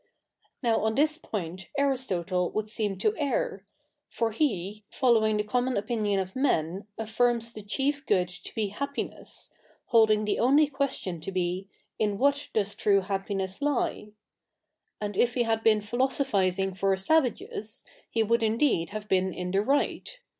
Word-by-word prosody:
'■ - - -43 0.6
Now 230 -2 +3
071 220 0 0
this 305 +3 +3
point 185 - -5
Aristotle 190 -11 0
would 215 0 -1
seem 210 -3 -2
to 420 - +2
ei 280 - 0
r. 195 -3 -2 0.4
For 230 -1 -1
he, 210 - -1
following 220 -4 +3
the 210 - +1
common 250 +4 0
opinio?i 205 -1 0
of 190 0 -4
men, 195 - 0
affii'ms 230 +1 0
the 215 - -7
chief 275 +7 -1
good 180 -1 +3
to 180 0 -9
be 215 -2 0
happiness, 280 +7 -5 0.4
holding 215 -2 +4
the 210 - 0
only 280 +6 +5
question 270 - -2
to 160 +5 -6
be, 185 +1 -2 0.3
in 205 -2 +1
what 285 +4 +1
does 205 -1 0
true 200 -1 +3
happiness 195 +1 -3
lie? 285 -6 0 0.9
And 205 -1 -4
if 245 +4 +2
he 245 - +3
had 225 -1 0
bee/i 215 -2 +4
philosophising 205 -6 +1
for 195 0 +1
savages, 225 -3 0 0.2
he 225 - +1
would 230 +2 +2
ifideed 225 - +2
have 215 0 -6
been 190 -1 +2
in 180 0 -4
the 195 +1 +2
right. 285 - 0
215 Hz, 160 wpm, -28 LUFS, 195-245 Hz, 0.9 s, only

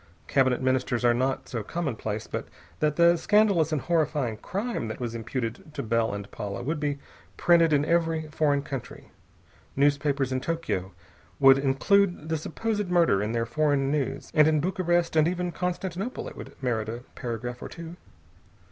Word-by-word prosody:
Cabinet 130 -2 +2
ministers 130 -1 +1
are 120 - +5
not 130 +2 -1
so 120 - -3
commonplace 110 -6 -3
but - - -5 0.3
that 150 -1 +1
the 170 +1 +5
scandalous 200 -5 +3
and 155 -3 0
horrifying 150 -8 0
crime 205 - -3
that 110 - -6
was 120 -2 -3
imputed 115 +4 -4
to 140 - -3
Bell 115 0 +1
and 100 0 -6
Paula 105 +1 -5
would 150 +4 -2
be 145 -1 -1 0.4
printed 170 -2 +4
in 145 -1 +3
every 165 -1 +1
foreign 145 -2 +1
country. 135 -3 -7 0.6
Newspapers 140 -1 +2
in 130 0 -1
Tokio 115 - -2 0.5
would 135 -1 +7
include 160 +5 +2
the 160 - +1
supposed 210 +5 -2
murder 170 - +3
in 105 +1 -1
their 115 -1 0
foreign 140 +2 +1
news, 145 -3 -2
and 155 -1 +6
in 155 -1 +3
Bucharest 175 0 0
and 155 0 +5
even 180 0 -1
Constantinople 180 +5 -3
it - - -9
would - - -10
merit 110 -3 -1
a 120 +2 -6
paragraph 120 +1 -5
or - - -6
two. 170 0 -9
145 Hz, 165 wpm, -27 LUFS, 120-170 Hz, 0.6 s, would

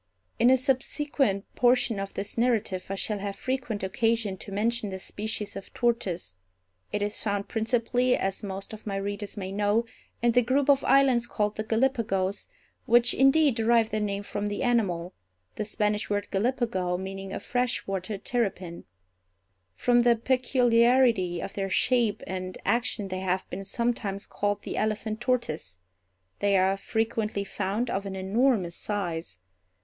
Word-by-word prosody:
In 240 - +6
a 260 - +6
subsequent 260 -4 0
portion 245 -3 +3
of 195 0 -5
this 200 +1 -3
narrative 225 -6 0
I 195 - -2
shall 210 +1 -2
have 200 0 -4
frequent 245 -4 -3
occasion 225 +1 0
to 200 - -9
mention 220 +2 0
this 190 -1 -6
species 210 -1 -4
of 195 - -8
tortoise. 190 - -1 0.6
It 205 0 -1
is 205 +1 -2
found 205 -2 -1
principally, 245 +2 +1
as 195 0 -2
most 195 +1 -6
of 215 0 -10
my 200 - -2
readers 205 +1 -4
may 190 -1 -4
know, 205 +3 +1 0.4
in 240 - +5
the 245 +1 +4
group 265 +4 +3
of 275 -1 +2
islands 260 -4 +4
called 210 -1 -1
the 215 - -2
Gallipagos, 220 -5 0 0.4
which, 240 0 +5
indeed, 270 +1 +5
derive 225 0 +3
their 215 - 0
name 200 -1 -2
from 205 0 -3
the 205 - -2
animal—the 175 - -2
Spanish 210 0 -1
word 205 0 -1
Gallipago 195 -5 0
meaning 195 +1 -6
a - - -3
fresh 245 0 -1
water 195 +1 -3
terrapin. 195 -6 -2 0.9
From 240 - +3
the 240 0 +5
peculiarity 240 -6 +3
of - - -6
their 195 -1 -2
shape 230 -1 +2
and 185 0 -5
action 225 -1 0
they 185 0 -3
have 185 0 -1
been 195 +2 -4
sometimes 210 -2 -1
called 205 0 -2
the - - -4
elephant 215 +1 -1
tortoise. 160 - -1 0.6
They 200 -1 +3
are 190 +1 +3
frequently 220 0 -1
found 200 +4 -2
of 195 +1 -2
an 190 - -5
enormous 190 -2 +1
size. 170 - -3
210 Hz, 155 wpm, -27 LUFS, 195-240 Hz, 0.9 s, In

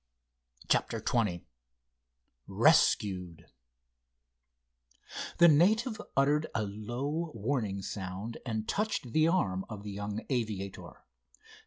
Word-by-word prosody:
CHAPTER - - +1
XX 105 -8 0 1.0
RESCUED 90 -5 +2 1.9
The 170 - +8
native 215 - +3 0.2
uttered 145 +3 +3
a 110 - +1
low, 120 +11 -3
warning 110 -4 -2
sound, 95 +4 -5
and 110 -3 -3
touched 205 - -2
the 155 0 +4
arm 95 - +1
of 105 -3 -7
the 105 - -6
young 105 +2 -5
aviator. 105 -6 -4
110 Hz, 95 wpm, -31 LUFS, 100-150 Hz, 1.9 s, The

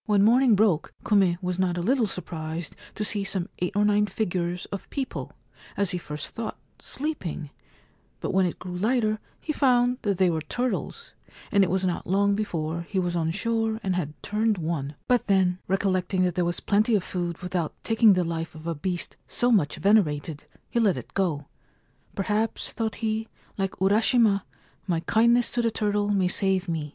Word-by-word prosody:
When 205 -2 +4
morning 240 +1 +5
broke 195 -6 +2
Kume 195 -5 +3
was 180 0 -2
not 180 -2 +1
a - - -1
little 245 +2 +2
surprised 165 -3 -5 0.2
to 210 - -2
see 205 -1 0
some 190 -2 -2
eight 180 +2 -2
or 205 0 +3
nine 210 0 +3
figures 180 -3 -2
of 200 - -6
people, 270 -2 -4 0.4
as 200 -2 +1
he 180 - -1
first 150 -3 -6
thought, 225 -1 -5 0.2
sleeping; 190 - -4 0.7
but - - -3
when 190 -1 +4
it 175 - -5
grew 180 -1 -7
lighter 215 +2 +1 0.2
he 305 - -3
found 250 -3 +3
that 200 -3 0
they 185 -1 +4
were 160 -1 -1
turtles, 245 +10 -3 0.4
and 200 -1 +5
it 190 - +1
was 190 +1 +1
not 180 -2 -2
long 200 +2 +3
before 170 -6 -2
he 200 - -3
was 175 -1 0
on 165 -2 0
shore 225 +4 0
and 190 -2 0
had 155 -4 -3
turned 215 0 +1
one; 155 -4 -3
but 245 -1 +2
then, 185 -2 +3
recollecting 185 -1 +1
that 180 -1 +1
there 175 0 0
was 175 0 0
plenty 215 +3 +3
of 195 - +1
food 175 -3 -3
without 180 -3 -2
taking 225 -2 +5
the 180 -1 +2
life 165 -1 -4
of 155 0 -11
a 170 - -1
beast 175 +3 -3
so 245 0 +1
much 185 -11 +3
venerated, 160 -7 +1 0.3
he 235 - +1
let 210 -5 +3
it - - -9
go. 165 -7 0 0.3
' - - -36
Perhaps,' 210 +3 -1
thought 220 -2 -2
he, 220 +1 -1
* - - -32
like 195 -1 -1
Urashima, 205 +1 +3 0.4
my 170 -3 0
kindness 235 +5 +3
to 240 - 0
the 230 - +2
turtle 205 -2 0
may 195 -3 +2
save 190 0 +1
me. 160 -3 -2
195 Hz, 190 wpm, -26 LUFS, 175-215 Hz, 0.7 s, morning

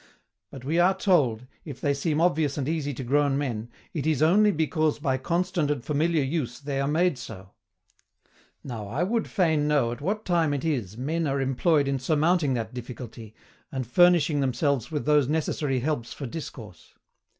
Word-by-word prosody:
But, 130 -2 -10
we 160 +5 +1
are 190 +2 +4
told, 135 - +2 0.2
if 140 -5 -8
they 140 +1 +1
seem 150 +2 -1
obvious 160 -4 +1
and 140 -2 -2
easy 155 -3 -1
to 130 0 -6
grown 140 +2 +2
men, 120 -5 -3 0.2
IT 155 -2 -2
IS 155 -2 +2
ONLY 205 +7 +5
BECAUSE 155 -3 +1
BY 135 -3 0
CONSTANT 170 +1 0
AND 140 -4 -2
FAMILIAR 155 +1 +1
USE 135 -4 -3
THEY 140 -1 -3
ARE 140 - 0
MADE 160 -1 +1
SO. 100 -5 -9 1.1
Now, 115 -6 -6
I 135 - -1
would 225 +4 0
fain 160 -7 +1
know 140 -6 +2
at 120 - -7
what 210 +7 -2
time 165 -5 +2
it 140 - -4
is 115 - -2
men 155 +5 -1
are 140 0 0
employed 140 +3 +2
in 135 -1 0
surmounting 150 +1 +2
that 115 -1 -4
difficulty, 120 -3 -8 0.4
and 130 -3 -3
furnishing 170 +2 +4
themselves 135 -1 0
with 150 -2 -3
those 150 -3 +4
necessary 145 -3 -1
helps 135 -4 -2
for 140 - -6
discourse. 115 - -9
145 Hz, 180 wpm, -26 LUFS, 130-160 Hz, 1.1 s, ONLY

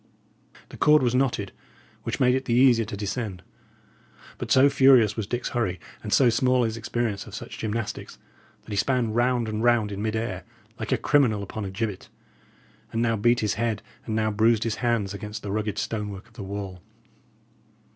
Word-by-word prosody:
The - - -11
cord 150 -2 +5
was 120 -1 +2
knotted, 125 -6 0 0.5
which - - -4
made 125 -1 +4
it 130 0 -1
the 120 - +1
easier 120 -3 +5
to 100 - -6
descend; 100 -2 -4 1.0
but - - -5
so 130 +2 +6
furious 130 -7 +5
was 110 -3 -3
Dick's 120 +2 -2
hurry, 95 -7 -1 0.2
and 105 - -6
so 130 - +5
small 125 +1 +2
his 110 -1 -1
experience 115 -2 -3
of - - -9
such - - -8
gymnastics, 110 0 -4 0.5
that - - -12
he - - -2
span 125 -2 +1
round 120 0 +1
and 110 +1 -3
round 120 -3 +3
in 100 0 -5
mid 110 0 -1
air 110 -5 -3 0.4
like - - -4
a - - +3
criminal 125 -8 +2
upon 105 +1 -5
a - - -4
gibbet, 100 0 -4 0.8
and 115 - -2
now 115 -1 +2
beat 120 +3 +2
his 105 -2 +1
head, 115 -3 -1 0.2
and 110 - -2
now 110 0 +1
bruised 110 +1 +3
his 115 -2 -2
hands, 115 -5 0
against 105 +1 -7
the 100 - -4
rugged 105 0 -2
stonework 105 -1 -4
of 120 - -24
the 110 - -9
wall. 95 -2 -6
110 Hz, 190 wpm, -25 LUFS, 105-120 Hz, 1.0 s, so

